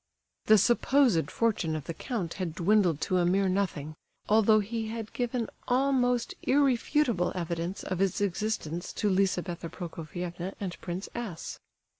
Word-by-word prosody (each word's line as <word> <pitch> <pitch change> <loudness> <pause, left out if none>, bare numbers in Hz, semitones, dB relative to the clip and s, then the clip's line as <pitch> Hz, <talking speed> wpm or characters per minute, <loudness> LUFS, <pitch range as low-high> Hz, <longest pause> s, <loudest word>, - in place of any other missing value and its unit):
The 215 - +8
supposed 240 - +3
fortune 205 -9 0
of 155 - -4
the 165 - -5
count 190 - -3
had 165 -3 -3
dwindled 180 -4 +3
to 185 - +1
a - - +3
mere 195 +2 +3
nothing, 185 -6 -1 0.3
although 215 0 +5
he 220 +2 -3
had 225 -1 -6
given 245 -1 -1 0.2
almost 250 -2 +2
irrefutable 260 - +2
evidence 170 +1 -3
of 185 -1 -3
its 195 -2 +1
existence 190 -4 -2
to 210 -2 0
Lizabetha 180 -3 0
Prokofievna 175 +2 -6
and 185 -3 -4
Prince 180 +2 -4
S. 220 -9 -5
195 Hz, 140 wpm, -29 LUFS, 175-230 Hz, 0.3 s, The